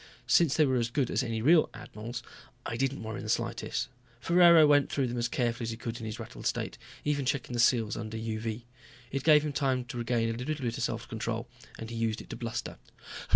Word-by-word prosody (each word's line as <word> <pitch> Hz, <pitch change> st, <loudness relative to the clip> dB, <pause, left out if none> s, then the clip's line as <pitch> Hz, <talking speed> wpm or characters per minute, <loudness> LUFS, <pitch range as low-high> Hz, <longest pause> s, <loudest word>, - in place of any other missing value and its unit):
Since 155 Hz, -4 st, +4 dB
they 155 Hz, -, +6 dB
were 130 Hz, -2 st, +2 dB
as 120 Hz, -1 st, 0 dB
good 130 Hz, 0 st, 0 dB
as -, -, +1 dB
any 115 Hz, -3 st, -2 dB
real 160 Hz, +3 st, +5 dB
admiral's 115 Hz, +3 st, -7 dB, 0.4 s
I -, -, -3 dB
didn't 135 Hz, +1 st, -1 dB
worry 110 Hz, 0 st, -5 dB
in -, -, -7 dB
the 110 Hz, -, -6 dB
slightest. -, -, -1 dB, 0.3 s
Ferraro 170 Hz, 0 st, +7 dB
went 145 Hz, -1 st, +4 dB
through 140 Hz, -, +1 dB
them 120 Hz, 0 st, -2 dB
as 120 Hz, -, +1 dB
carefully 120 Hz, -3 st, -1 dB
as -, -, -3 dB
he 115 Hz, -, -4 dB
could 115 Hz, 0 st, -5 dB
in 110 Hz, -, -5 dB
his 110 Hz, +2 st, -5 dB
rattled 110 Hz, -, -5 dB
state, -, -, -2 dB, 0.3 s
even 145 Hz, -1 st, +1 dB
checking 125 Hz, -1 st, -1 dB
the 120 Hz, -, -2 dB
seals 115 Hz, -2 st, +3 dB
under 110 Hz, 0 st, -5 dB
UV. 110 Hz, +1 st, -3 dB, 0.5 s
It 135 Hz, 0 st, -2 dB
gave 150 Hz, -1 st, +6 dB
him 150 Hz, -, -2 dB
time 130 Hz, -3 st, 0 dB
to 120 Hz, 0 st, -6 dB
regain 115 Hz, -1 st, 0 dB
a 120 Hz, +2 st, -5 dB
bit 125 Hz, -5 st, -2 dB
of 115 Hz, 0 st, -5 dB
control 115 Hz, +1 st, -3 dB, 0.3 s
and 115 Hz, 0 st, -7 dB
he -, -, -5 dB
used 115 Hz, -1 st, -1 dB
it -, -, -11 dB
to -, -, -4 dB
bluster. 115 Hz, -2 st, -5 dB
120 Hz, 225 wpm, -30 LUFS, 115-135 Hz, 0.5 s, Ferraro